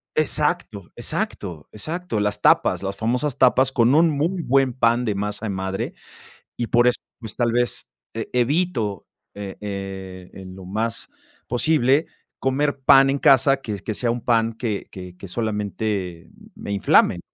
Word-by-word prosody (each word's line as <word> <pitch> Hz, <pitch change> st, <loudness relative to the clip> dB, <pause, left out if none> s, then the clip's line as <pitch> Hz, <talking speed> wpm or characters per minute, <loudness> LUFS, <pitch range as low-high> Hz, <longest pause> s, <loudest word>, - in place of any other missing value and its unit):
exacto, 150 Hz, -, 0 dB
exacto, 80 Hz, -4 st, -4 dB
exacto, 155 Hz, -, -4 dB
las 105 Hz, 0 st, -1 dB
tapas, -, -, +3 dB
las 100 Hz, 0 st, -4 dB
famosas 125 Hz, +6 st, -1 dB
tapas 130 Hz, +1 st, +4 dB
con 120 Hz, 0 st, +3 dB
un 165 Hz, +2 st, +5 dB
muy 160 Hz, +5 st, -1 dB
buen 135 Hz, -3 st, +2 dB
pan 120 Hz, -1 st, +2 dB
de 105 Hz, -3 st, -1 dB
masa 105 Hz, +2 st, -3 dB
de -, -, -2 dB
madre, 95 Hz, 0 st, -3 dB, 0.6 s
y 120 Hz, -, -3 dB
por 120 Hz, +1 st, +4 dB
eso, 125 Hz, -, +4 dB, 0.2 s
pues, 110 Hz, -3 st, -8 dB
tal 120 Hz, -2 st, +1 dB
vez, 120 Hz, +1 st, -1 dB, 0.3 s
eh, 115 Hz, 0 st, -5 dB
evito, 125 Hz, -, 0 dB, 0.3 s
eh, 100 Hz, -1 st, -7 dB
eh, 95 Hz, -2 st, -7 dB
en 95 Hz, -1 st, -10 dB
lo 95 Hz, -, -11 dB
más 110 Hz, +5 st, -3 dB, 0.4 s
posible 140 Hz, +3 st, +2 dB, 0.3 s
comer 140 Hz, +2 st, 0 dB
pan 135 Hz, +1 st, +6 dB
en 140 Hz, -, +1 dB
casa 135 Hz, 0 st, +5 dB
que 105 Hz, -5 st, -5 dB
que 110 Hz, +3 st, -4 dB
sea 120 Hz, +2 st, -1 dB
un 120 Hz, 0 st, -3 dB
pan 115 Hz, -1 st, +2 dB
que 110 Hz, -3 st, -3 dB
que 90 Hz, -1 st, -10 dB
que 100 Hz, -, -9 dB
solamente 105 Hz, -4 st, -3 dB, 0.3 s
me -, -, -7 dB
inflame. 100 Hz, -1 st, +3 dB
115 Hz, 160 wpm, -22 LUFS, 100-135 Hz, 0.6 s, pan